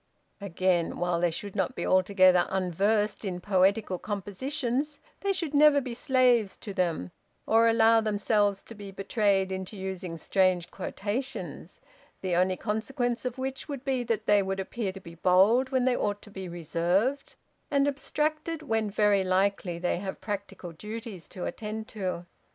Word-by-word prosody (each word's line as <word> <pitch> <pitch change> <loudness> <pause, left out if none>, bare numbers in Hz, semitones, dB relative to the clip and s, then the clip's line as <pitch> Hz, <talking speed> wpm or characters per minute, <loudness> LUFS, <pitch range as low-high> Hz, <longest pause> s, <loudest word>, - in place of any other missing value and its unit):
Again, 185 -3 0
while 175 -1 0
they 175 0 +2
should 190 +4 -6
not - - -1
be - - -3
altogether 185 -1 +4
unversed 200 +4 0
in 185 -3 -3
poetical 190 0 +2
compositions, 245 +8 -3 0.2
they 395 - 0
should 340 -6 -2
never 295 0 +6
be 255 -3 -5
slaves 245 -5 +2
to 205 - -7
them, 170 - -1 0.3
or 225 +1 +4
allow 225 0 +5
themselves 205 -1 +1
to - - -11
be 205 -2 -9
betrayed 195 -1 +1
into 190 +2 -5
using 190 -3 -5
strange 185 0 +1
quotations, 220 +8 -5 0.4
the 185 -2 0
only 185 +1 +2
consequence 235 +3 -2
of 250 0 -3
which 265 0 -4
would 275 -2 -5
be 260 -2 0
that 230 -2 -1
they 205 -1 +5
would 195 0 -2
appear 195 +1 -3
to 195 - -10
be 170 -3 -12
bold 195 +9 +4
when 260 -2 +1
they 255 -1 +3
ought 205 -2 -2
to 210 - -12
be 190 -2 -7
reserved, 175 - 0 0.3
and 280 -2 +2
abstracted 310 +3 -2
when 225 -6 0
very 205 -1 +3
likely 185 -1 +1
they 175 0 0
have 190 +1 -5
practical 200 -4 -5
duties 210 +1 -7
to 180 - -6
attend 220 0 -5
to. 185 -4 -4
205 Hz, 160 wpm, -28 LUFS, 185-240 Hz, 0.4 s, never